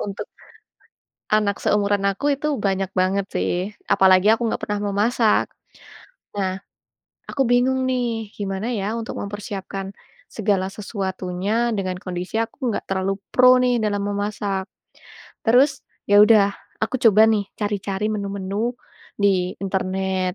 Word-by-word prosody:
Untuk 200 -1 -5 1.1
anak 210 -1 +1
seumuran 205 -1 +2
aku 280 +9 0
itu 300 +2 -3
banyak 195 -2 -1
banget 190 +1 +1
sih. - - -1 0.4
Apalagi 185 +1 +5
aku 225 - -1
enggak - - -2
pernah 210 0 -1
memasak. 220 +2 +2 0.9
Nah, 190 -1 -2 0.6
aku 275 - -1
bingung 260 +2 +2
nih, 235 -4 -1
gimana 195 +2 -3
ya 210 -3 -2
untuk 225 - -6
mempersiapkan 200 -1 -6 0.3
segala 200 -3 0
sesuatunya, 195 +2 -2
dengan 190 -3 -2
kondisi 180 +1 -5
aku 235 0 -3
nggak - - -2
terlalu 190 0 0 0.2
pro 255 0 +7
nih 250 -1 +2
dalam 205 -2 0
memasak. 205 -1 -2 0.8
Terus, 255 +5 +3 0.2
ya 205 0 +6
udah 210 -2 +5 0.3
aku 220 +4 0
coba 215 -1 +7
nih 210 -2 +1
cari-cari 205 -1 -2
menu-menu 200 +2 -2 0.4
di 190 -3 +1
internet. 190 -1 -1
205 Hz, 125 wpm, -22 LUFS, 190-225 Hz, 1.1 s, pro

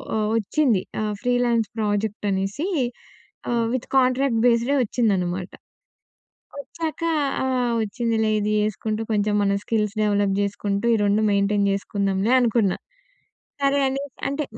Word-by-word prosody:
ఒ - - +1 0.2
ఒచ్చింది. 225 -2 +1 0.2
ఆహ్, 210 -1 -1
ఫ్రీలాన్స్ 245 -3 +1
ప్రాజెక్టనేసి 205 - -1 0.8
ఆహ్, 235 -1 +1
విత్ 255 - -3
కాంట్రాక్ట్ 255 -2 +2
బేస్‌డే 240 +4 +3
వచ్చిందనమాట. 190 -6 -1 1.1
వచ్చాక 315 +4 -5 0.4
ఆహ్, 250 -2 0
వచ్చిందిలే 220 0 -1
ఇది 210 +1 -1
చేసుకుంటూ 215 +1 -2
కొంచెం 210 0 +1
మన 200 0 +2
స్కిల్స్ 210 -1 -1
డెవలప్ 205 -2 +1
జేసుకుంటూ, 200 +1 -2
ఈ - - +1
2 205 +2 +2
మెయింటైన్ 200 0 +2
జేసుకుందాంలే 200 +2 0
అనుకున్నా. 225 -5 +2 0.9
సరే 280 +1 +3
అని, 270 +1 -2 0.3
అంటే 280 +2 -2
215 Hz, 115 wpm, -23 LUFS, 200-245 Hz, 1.1 s, బేస్‌డే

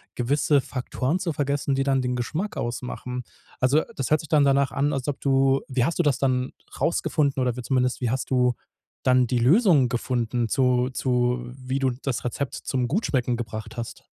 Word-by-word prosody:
gewisse 140 +3 +2
Faktoren 130 +4 -2
zu 175 -3 -1
vergessen, 140 -1 -1
die 135 - +1
dann 135 -1 +2
den 125 0 -1
Geschmack 165 - -3
ausmachen. 125 +1 -4 0.4
Also, 140 +5 +4
das 135 +2 -3
hört 155 - +5
sich 155 - -8
dann 150 -2 +4
danach 140 -1 +3
an, 145 +2 0
als 135 -1 -3
ob 145 - -3
du 135 0 +3
wie 130 -1 +1
hast 170 - -1
du 175 - +2
das 145 -4 +2
dann 130 -1 0 0.3
rausgefunden 145 -4 +1
oder 125 -2 0
wie 125 - -5
zumindest 125 0 0
wie 120 - 0
hast 130 +2 -2
du 125 -1 +3 0.5
dann 125 -1 +4
die 120 0 0
Lösung 155 - +5
gefunden 120 -2 -1
zu 125 -1 +2
zu 125 -1 0
wie 130 +1 -3
du 130 -2 +1
das 130 -3 -2
Rezept 130 +3 -3
zum 125 -3 -2
gut 205 +10 0
schmecken 125 -3 0
gebracht 110 -1 -6
hast? 115 - -6
130 Hz, 195 wpm, -25 LUFS, 125-140 Hz, 0.5 s, hört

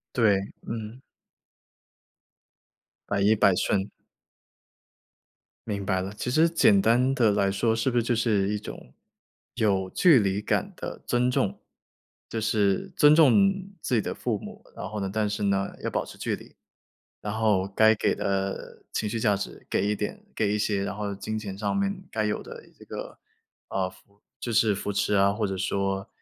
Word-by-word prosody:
对， 110 -5 +4 0.3
嗯。 115 +2 -6 2.1
百 100 -1 0
依 105 +2 +5
百 100 -3 +4
顺。 100 +1 0 1.8
明 100 -2 -2
白 95 0 0
了， 95 +2 -5
其 125 - -3
实 160 +6 +4
简 105 -11 +4
单 120 +6 +3
地 115 -5 +3
来 100 -1 +2
说 110 +3 +1
是 115 +4 +1
不 120 - +1
是 - - +3
就 120 +1 0
是 105 -4 +1
一 105 0 -1
种 65 -10 -10 0.6
有 100 -5 +1
距 165 - +6
离 100 -2 0
感 - - -1
的 - - -7
尊 125 +1 +2
重。 100 -5 -1 0.7
就 115 - -2
是 105 - +1
尊 150 0 +7
重 155 -5 +7 0.5
自 125 - -1
己 115 - +4
的 - - -4
父 - - -2
母， - - -10
然 - - -5
后 105 +1 -5
呢 95 - -2
但 110 -1 0
是 105 0 -3
呢， 100 0 0
要 - - -1
保 - - -1
持 - - -11
距 - - -1
离。 - - -16 0.7
然 105 - -4
后 105 -4 +2
该 110 0 +6
给 - - +1
的 95 0 -3
情 105 - -1
绪 115 +1 -3
价 105 -3 +3
值 100 - -7
给 - - +1
一 105 - +1
点 105 - -5
给 105 -2 +1
一 105 - 0
些， 100 -1 0
然 - - -4
后 105 -1 -3
金 110 +2 -4
钱 100 -3 -6
上 110 - -1
面 200 -1 -1
该 110 -1 -1
有 105 - -1
的 - - -10 0.2
这 - - -14
个， - - -7 0.5
呃， 95 -1 -1
扶 100 +2 -23 0.2
就 120 - -3
是 110 -2 +3
扶 100 +1 -3
持 100 +1 0
啊， 100 0 +4
或 105 0 -1
者 95 -1 -3
说， 95 0 -1
105 Hz, 195 characters per minute, -26 LUFS, 100-115 Hz, 2.1 s, 尊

